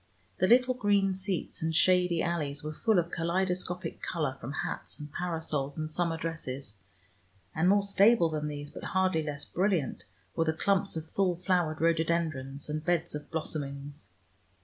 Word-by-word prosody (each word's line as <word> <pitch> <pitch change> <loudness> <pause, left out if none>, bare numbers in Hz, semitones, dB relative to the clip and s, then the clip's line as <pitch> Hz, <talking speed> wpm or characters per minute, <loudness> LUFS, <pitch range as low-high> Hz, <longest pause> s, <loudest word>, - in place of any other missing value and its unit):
The 185 - +4
little 250 +3 +5
green 205 -5 +2
seats 190 -1 -2
and 160 0 -1
shady 180 -1 +4
alleys 150 -4 -2
were 155 0 -4
full 220 +5 +2
of 170 0 +1
kaleidoscopic 180 +1 -1
color 150 -6 -2
from 125 - -5
hats - - -5
and 150 -1 -9
parasols 160 -5 -2
and 155 0 -3
summer 170 0 0
dresses, 140 -9 -5 0.7
and 170 +3 +2
more 200 +1 +4
stable 200 -1 +5
than 150 -1 -2
these, 145 0 -5
but - - -9
hardly 185 -4 +3
less 150 -1 -4
brilliant, 180 -6 0 0.3
were 165 - +2
the 160 - +1
clumps 195 +3 +1
of 160 0 -5
full 185 0 +1
flowered 175 -3 0
rhododendrons 160 -4 0
and 155 0 -3
beds 175 0 0
of 150 0 -6
blossomings. 140 -6 -4
165 Hz, 160 wpm, -30 LUFS, 150-185 Hz, 0.7 s, little